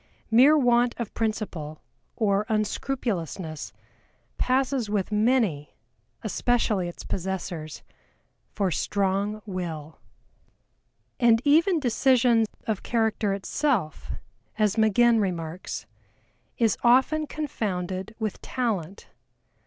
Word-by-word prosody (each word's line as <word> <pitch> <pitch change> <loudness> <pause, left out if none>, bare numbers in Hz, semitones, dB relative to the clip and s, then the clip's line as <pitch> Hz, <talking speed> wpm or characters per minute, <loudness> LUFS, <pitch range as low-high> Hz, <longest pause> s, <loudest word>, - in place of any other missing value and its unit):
Mere 270 +7 +7
want 245 -3 +3
of 235 -3 -5
principle 190 -9 -3 0.3
or 205 -1 +1
unscrupulousness 195 - -2 0.7
passes 260 -3 +1
with 205 -1 -1
many, 210 - +1 0.5
especially 215 -4 +1
its 175 - -10
possessors, 175 -4 -4 0.7
for 195 -3 -1
strong 200 +4 -1
will. 165 -6 -5 1.2
And 235 -3 +5
even 330 +5 +4
decision 245 -3 +3 0.2
of 215 -3 -2
character 220 -3 0
itself, 200 - -1 0.5
as 215 -2 +2
MAGINN 225 +1 +4
remarks, 175 -3 -3 0.7
is 225 -3 +2
often 265 +6 +4
confounded 195 - -3
with 215 -3 -4
talent. 200 -8 -3
215 Hz, 90 wpm, -26 LUFS, 185-240 Hz, 1.2 s, Mere